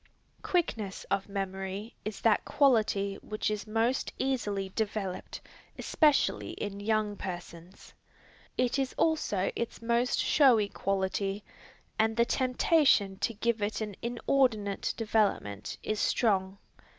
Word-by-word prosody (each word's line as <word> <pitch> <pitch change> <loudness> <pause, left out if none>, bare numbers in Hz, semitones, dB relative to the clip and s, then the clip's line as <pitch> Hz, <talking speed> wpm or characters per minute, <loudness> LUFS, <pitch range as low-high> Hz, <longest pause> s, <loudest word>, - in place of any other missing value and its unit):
Quickness 225 - -1
of 200 0 0
memory 195 +2 -4
is 215 -1 -5
that 225 -2 +3
quality 215 -7 +2
which 215 0 -2
is 210 0 -4
most 225 +4 0
easily 205 -7 -1
developed, 200 -2 -3 0.4
especially 300 -3 +2
in 200 -1 -5
young 215 0 0
persons. 175 -1 -8 0.6
It 250 +2 +1
is 265 -1 -1
also 210 - +1
its 235 - -4
most 235 +2 +1
showy 240 -8 +4
quality, 195 +1 -1 0.6
and 220 +1 +2
the 235 - +4
temptation 255 - +3
to 230 - -1
give 235 +1 0
it 205 +1 -1
an 210 -3 -4
inordinate 235 -4 +1
development 210 - 0
is 215 -1 -2
strong. 195 -4 +1
215 Hz, 115 wpm, -30 LUFS, 195-235 Hz, 0.6 s, showy